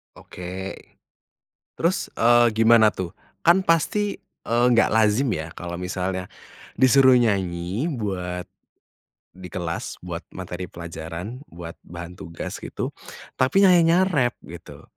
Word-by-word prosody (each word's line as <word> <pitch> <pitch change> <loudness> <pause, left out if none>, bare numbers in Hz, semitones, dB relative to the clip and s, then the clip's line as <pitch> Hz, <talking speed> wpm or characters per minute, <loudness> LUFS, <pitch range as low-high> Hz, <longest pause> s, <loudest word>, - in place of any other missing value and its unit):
Oke. 95 +2 -7 1.0
Terus, 170 +3 0
eee, 120 +1 +5
gimana 110 -1 +5
tuh? 90 -1 -5 0.3
Kan 180 +3 +4
pasti, 200 +5 +1 0.3
eee, 120 +1 +2
nggak 115 - +4
lazim 110 +4 +3
ya, 80 +1 -3
kalau 85 0 -6
misalnya 90 0 -3 0.5
disuruh 130 0 +6
nyanyi 95 - 0
buat 90 - -3 0.9
di 90 0 -10
kelas, 85 -1 -4
buat 85 -1 -5
materi 90 0 -6
pelajaran, 85 +6 -7
buat 85 0 -10
bahan 85 +1 -9
tugas, 85 -1 -7
gitu, - - -5 0.5
tapi 140 +10 +4
nyanyinya 175 -1 +5
rap 140 -11 +1
gitu. - - -11
100 Hz, 115 wpm, -23 LUFS, 90-130 Hz, 1.0 s, disuruh